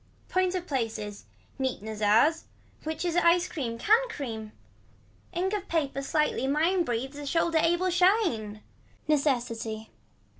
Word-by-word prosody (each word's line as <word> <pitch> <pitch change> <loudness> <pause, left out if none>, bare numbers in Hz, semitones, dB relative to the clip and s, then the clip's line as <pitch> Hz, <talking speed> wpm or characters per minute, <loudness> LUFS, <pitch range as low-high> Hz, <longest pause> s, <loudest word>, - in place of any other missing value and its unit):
Points 370 0 +1
of 360 -1 -3
places. 220 - -3 0.3
Neat 260 -6 -2
Nezars. 220 +9 +2 0.4
Which 320 +3 -3
is 345 -1 0
a 345 0 +5
cream, 240 -8 -4
can 450 - +3
cream. 225 - -5 0.8
Ink 370 +3 -1
of 405 -2 -3
paper 280 -5 -1
slightly 275 -2 0
mine 330 +6 +2
breathes 265 +1 -3
a 290 - -6
shoulder 330 +1 +2
able 345 +2 +2
shine. 350 - +2 0.4
Necessity. 235 -7 0
290 Hz, 125 wpm, -28 LUFS, 230-350 Hz, 0.8 s, a